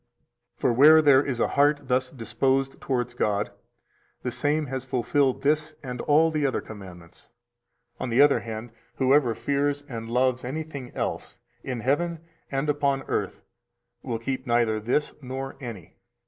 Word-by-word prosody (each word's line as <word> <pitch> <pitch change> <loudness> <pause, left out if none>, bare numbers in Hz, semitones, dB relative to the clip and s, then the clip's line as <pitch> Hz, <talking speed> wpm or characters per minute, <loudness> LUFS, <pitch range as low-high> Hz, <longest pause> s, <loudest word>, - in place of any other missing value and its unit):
For - - +1
where 150 +6 +8
there 140 -3 +6
is 130 -4 -3
a - - +2
heart 145 +1 +3
thus 130 0 0
disposed 135 +3 -1
towards 125 -2 -1
God, 105 -4 0 0.7
the 125 - -2
same 150 +4 0
has 130 -1 -4
fulfilled 130 +1 0
this 150 +1 +1
and 125 -2 -5
all 160 +2 +4
the 155 -2 -1
other 135 -2 +1
commandments. 90 -5 -12 0.7
On 130 - -3
the 120 +2 +1
other 145 0 +6
hand, 110 +1 -7 0.2
whoever 130 -3 +3
fears 145 +2 -1
and 115 -4 -6
loves 130 +1 +1
anything 140 -1 -5
else - - -4 0.3
in 125 -3 -4
heaven 165 +6 0 0.3
and 135 +2 -1
upon 140 -2 +1
earth - - -3 0.6
will 120 -3 -3
keep 130 +3 -4
neither 120 -2 +2
this 125 +7 0
nor 135 +1 -5
any. 100 -9 -9
130 Hz, 150 wpm, -26 LUFS, 120-145 Hz, 0.7 s, where